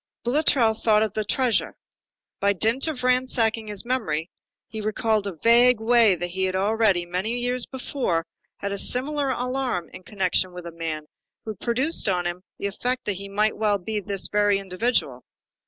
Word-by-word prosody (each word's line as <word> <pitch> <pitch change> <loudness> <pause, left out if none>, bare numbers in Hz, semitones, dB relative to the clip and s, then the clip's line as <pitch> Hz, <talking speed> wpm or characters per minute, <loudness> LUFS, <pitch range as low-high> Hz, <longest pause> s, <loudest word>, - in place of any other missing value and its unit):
Boulatruelle 240 -4 +2
thought 215 -1 +4
of 215 -2 -2
the 215 - -1
treasure. 240 +2 0 0.6
By 200 0 +2
dint 225 - 0
of 280 -6 -3
ransacking 245 -3 +1
his 205 -1 -4
memory, 190 -10 -2 0.4
he 220 0 -6
recalled 215 0 0
in 195 - -5
a - - -29
vague 240 +1 +6
way 225 -3 +4
that 175 +1 -4
he 190 +1 -1
had 185 0 -1
already, 200 -2 +2
many 185 +7 -2
years 245 0 -1
before, 250 - -2 0.3
had 200 - -4
a 200 - -2
similar 275 +5 +1
alarm 250 -7 -2
in - - -9
connection 185 -2 0
with 180 -1 -8
a 170 - -6
man 160 -2 -5 0.4
who 220 - -4
produced 245 - 0
on 180 -2 0
him 175 +1 -3 0.2
the - - -5
effect 250 +6 -2
that 205 - 0
he 200 +1 -7
might 210 +2 +1
well 210 -2 +2
be 210 +3 -3
this 200 -1 -3
very 205 -1 +2
individual. 190 - -1
215 Hz, 180 wpm, -24 LUFS, 190-245 Hz, 0.6 s, vague